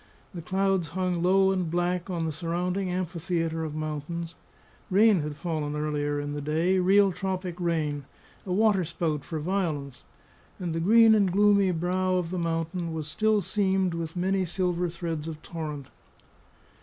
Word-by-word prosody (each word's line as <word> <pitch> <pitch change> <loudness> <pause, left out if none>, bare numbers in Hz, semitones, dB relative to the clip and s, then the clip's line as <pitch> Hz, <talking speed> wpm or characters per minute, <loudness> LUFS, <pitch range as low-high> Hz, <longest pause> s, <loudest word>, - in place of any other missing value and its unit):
The 175 - -6
clouds 190 0 0
hung 180 +1 -1
low 190 +2 +4
and 185 -3 -1
black 175 +2 -1
on 170 -3 -2
the 160 - -1
surrounding 180 +4 -2
amphitheatre 170 -2 -2
of 155 -1 -4
mountains; 155 +2 -4 0.6
rain 205 0 +5
had 150 -1 -4
fallen 150 -2 -3
earlier 145 -1 -1
in 145 0 -4
the 145 - -4
day, 165 +6 +1
real 195 +2 +5
tropic 185 -1 -3
rain, 155 -5 -1 0.4
a 185 - -6
waterspout 175 -7 +1
for 160 - -5
violence; 150 -6 -2 0.6
and 175 -3 -3
the 165 - -1
green 225 +5 +6
and 200 -4 +3
gloomy 200 0 +4
brow 185 +2 0
of 180 -2 -1
the 185 - -2
mountain 165 0 -2
was 155 -2 -4
still 215 +6 +2
seamed 190 -1 +1
with 165 0 -4
many 190 +2 +1
silver 180 0 -1
threads 165 -2 -4
of 160 -2 -6
torrent. 150 -5 -6
175 Hz, 155 wpm, -27 LUFS, 160-185 Hz, 0.6 s, green